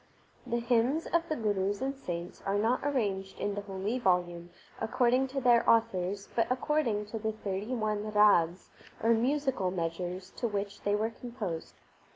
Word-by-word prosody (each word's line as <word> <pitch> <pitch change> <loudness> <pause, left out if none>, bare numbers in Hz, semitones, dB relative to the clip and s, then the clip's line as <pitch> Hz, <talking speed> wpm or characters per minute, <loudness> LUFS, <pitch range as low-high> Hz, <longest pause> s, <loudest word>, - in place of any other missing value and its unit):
The 235 -1 0
hymns 240 +6 +2
of 335 0 0
the 310 - 0
Gurus 205 -3 0
and 270 +1 -2
saints 175 -8 -6
are 195 +1 0
not 225 +5 +2
arranged 205 -9 -1
in 205 - -1
the 205 - -3
holy 200 +4 -3
volume 175 -4 +1 0.3
according 250 +3 +2
to 270 +1 -3
their 240 -2 +5
authors, 200 -3 +2
but 230 - +2
according 255 -5 0
to 225 - -2
the 220 0 -2
thirty 210 +3 -3
one 215 -2 -1
rags 200 -5 +4 0.3
or 230 +1 +5
musical 255 -4 +1
measures 180 +1 -3
to 240 - 0
which 200 -2 -4
they 205 0 +1
were 220 +2 0
composed. 220 -9 -6
215 Hz, 165 wpm, -30 LUFS, 190-245 Hz, 0.3 s, their